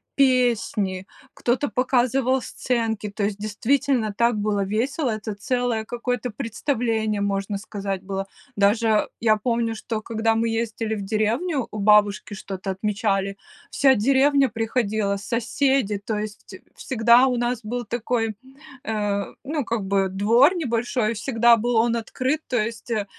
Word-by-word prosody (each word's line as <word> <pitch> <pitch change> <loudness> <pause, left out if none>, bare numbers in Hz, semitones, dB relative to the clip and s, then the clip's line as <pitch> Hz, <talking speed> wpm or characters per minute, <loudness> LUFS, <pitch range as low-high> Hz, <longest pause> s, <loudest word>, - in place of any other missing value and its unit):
песни, 235 -8 +1 0.3
кто-то 250 +4 0
показывал 255 +1 +1
сценки, 225 -4 -2
то 205 0 -3
есть 200 0 -2
действительно 225 +2 0
так 235 0 +3
было 205 -1 0
весело, 245 +6 -1
это 215 -1 -4
целое 245 +1 -1
какое-то 245 +1 -3
представление, 220 -2 -1
можно 200 0 -1
сказать, 195 -2 -4
было. 195 0 -3 0.3
Даже 215 +2 +2
я 215 -1 +3
помню, 230 0 -1
что 220 0 -4
когда 225 0 0
мы 225 +1 +1
ездили 225 -1 -2
в 200 - -5
деревню, 230 - 0
у - - -7
бабушки 210 0 +3
что-то 195 -1 -5
отмечали. 195 0 -1 0.3
Вся 275 -1 +4
деревня 270 +4 +3
приходила, 220 -3 -1
соседи, 230 0 0
то 215 0 -2
есть 210 0 -7 0.2
всегда 240 +1 +4
у 250 -2 0
нас 240 0 -1
был 240 +3 -4
такой, 225 -1 -1 0.5
э, 205 -2 -1 0.2
ну, 290 -1 -2
как 230 -2 -1
бы 195 -1 +1
двор 230 - +4
небольшой, 235 -6 -1
всегда 235 +1 +3
был 240 +2 -1
он 230 +1 +3
открыт. 255 +6 -1
То 250 - 0
есть, 225 +1 -3
э, 215 -3 -1
225 Hz, 140 wpm, -23 LUFS, 210-245 Hz, 0.5 s, Вся